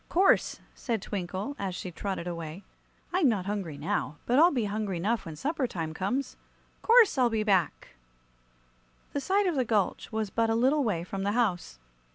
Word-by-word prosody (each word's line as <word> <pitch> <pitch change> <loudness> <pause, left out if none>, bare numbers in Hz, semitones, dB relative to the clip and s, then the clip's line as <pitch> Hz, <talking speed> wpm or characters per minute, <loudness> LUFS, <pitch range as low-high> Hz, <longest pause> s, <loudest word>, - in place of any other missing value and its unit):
"'Course," 380 +3 +3
said 230 -4 -2
Twinkle, 195 +7 -4
as 190 -2 -3
she 180 - -6
trotted 190 0 -4
away. 170 +1 -6 0.5
"I'm 355 -7 +4
not 200 -5 -1
hungry 195 -7 -3
now, 150 - -2
but 250 +3 +3
I'll 335 +3 +8
be 245 -9 -1
hungry 205 -3 -2
'nough 215 +4 -1
when 160 - -6
supper 280 - -1
time 160 -6 -4
comes. 250 +11 -2 0.4
'Course 455 - +5
I'll 245 -2 +4
be 220 -2 0
back!" 195 -5 +1 1.2
The 285 - -1
side 395 +6 +2
of 360 - +1
the 265 -4 +1
gulch 215 -3 0
was 220 -2 -2
but 230 -1 +1
a 225 - +2
little 270 +5 +3
way 190 -8 -1
from 195 +2 -5
the 200 +1 0
house. 190 - 0
215 Hz, 185 wpm, -28 LUFS, 185-260 Hz, 1.2 s, I'll